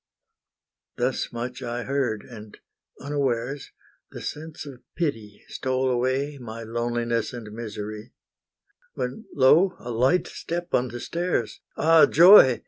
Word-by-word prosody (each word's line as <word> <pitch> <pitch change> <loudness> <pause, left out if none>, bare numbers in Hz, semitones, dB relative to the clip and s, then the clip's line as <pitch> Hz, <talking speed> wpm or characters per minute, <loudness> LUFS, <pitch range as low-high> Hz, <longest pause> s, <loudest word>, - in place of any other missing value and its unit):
Thus 125 +2 -1
much 125 +2 -5
I 120 -1 -4
heard, 130 -6 -1
and 110 -3 -12 0.4
unawares, 135 -2 -2 0.4
The - - -9
sense 155 0 -6
of 135 -4 -11
pity 115 - -3
stole 130 0 -1
away 130 +3 -1
My 115 -1 -8
loneliness 120 0 -2
and 110 -3 -8
misery, 110 0 -7 0.8
When 125 - -4
lo, 160 +8 +5
a 120 - -7
light 130 +10 +2
step 175 +1 -5
on 125 - +2
the 120 0 -7
stairs! 170 -7 -2 0.2
Ah 165 0 +6
joy! 170 - +8
125 Hz, 125 wpm, -25 LUFS, 115-145 Hz, 0.8 s, joy